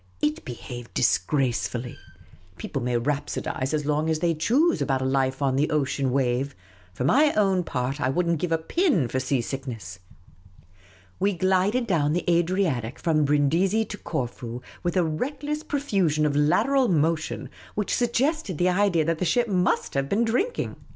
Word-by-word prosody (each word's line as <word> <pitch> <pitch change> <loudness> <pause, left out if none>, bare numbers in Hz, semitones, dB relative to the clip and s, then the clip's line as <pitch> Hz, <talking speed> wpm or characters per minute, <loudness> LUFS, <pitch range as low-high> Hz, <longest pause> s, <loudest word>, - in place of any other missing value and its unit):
It 150 +6 -1
behaved 120 -1 -8
disgracefully. 120 +1 0 0.6
People 135 - -4
may 120 0 0
rhapsodise 135 0 -2
as 150 -2 -1
long 150 +2 0
as 160 - +1
they 170 +1 +1
choose 265 - +2
about 135 -2 0
a - - -1
life 135 +1 0
on 135 -1 +1
the 150 +2 +2
ocean 140 -2 0
wave; 130 +1 0 0.4
for 95 - -4
my 290 - +4
own 195 -3 +2
part, 135 -1 -3
I 130 - +1
would 175 +6 0
n't 170 -2 +1
give 175 0 -2
a 165 - +3
pin 190 - +1
for 130 - -2
sea 130 0 0
sick 135 +3 -5
nes.s. 100 -6 -7 1.2
We 200 +2 +2
glided 190 +7 +2
down 155 -7 +1
the 175 - -2
Adriatic 170 - +1
from 155 -3 +1
Brindisi 165 +10 +2
to 210 - -7
Corfu 120 -4 -4 0.2
with 175 +1 -1
a 180 - +4
reckless 285 - -3
profusion 195 - 0
of 145 -1 0
lateral 240 - +3
motion 160 - 0 0.2
which 210 -1 -1
suggested 245 - 0
the 180 +3 +2
idea 180 -4 +2
that 165 0 0
the - - -1
ship 235 +8 +2
must 180 -2 +1
have 135 0 -1
been 225 +4 +2
drinking. 375 - -1
155 Hz, 170 wpm, -25 LUFS, 135-195 Hz, 1.2 s, my